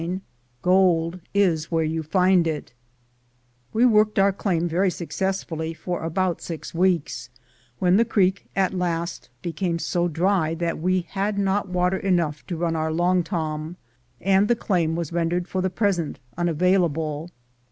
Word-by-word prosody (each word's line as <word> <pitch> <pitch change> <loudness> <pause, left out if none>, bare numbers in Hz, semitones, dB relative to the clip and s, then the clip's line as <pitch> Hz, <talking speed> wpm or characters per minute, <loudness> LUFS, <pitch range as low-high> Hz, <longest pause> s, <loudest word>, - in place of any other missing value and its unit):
CHAPTER 170 +2 -2
IX 190 - -6 0.4
GOLD 180 -2 +3 0.2
IS 170 -6 +2
WHERE 165 -1 +2
YOU 160 +1 -1
FIND 180 +2 +3
IT 150 -6 -4 1.0
WE 230 +3 +3
worked 215 -3 +4
our 195 0 +4
claim 175 -4 0
very 180 +4 +2
successfully 170 -2 -3
for 175 +2 -4
about 175 +2 -1
six 165 -3 -6
weeks, 170 -8 0 0.5
when 180 +5 +3
the 230 - +5
creek 200 -4 +1
at 190 -1 +1
last 170 -4 -2
became 170 0 -1
so 175 +1 0
dry 170 -1 +1
that 170 -1 -2
we 185 +2 +1
had 195 +4 -2
not 200 0 0
water 180 +1 +1
enough 170 -6 0
to 175 - -3
run 165 0 0
our 160 0 -1
long 175 +2 +2
torn, 160 -2 -3 0.4
and 195 +2 +3
the 240 - +3
claim 170 -7 0
was 170 -1 -4
rendered 175 +1 0
for 185 - -2
the 190 - 0
present 185 -4 0 0.2
unavailable. 165 -2 +1
175 Hz, 155 wpm, -24 LUFS, 165-190 Hz, 1.0 s, the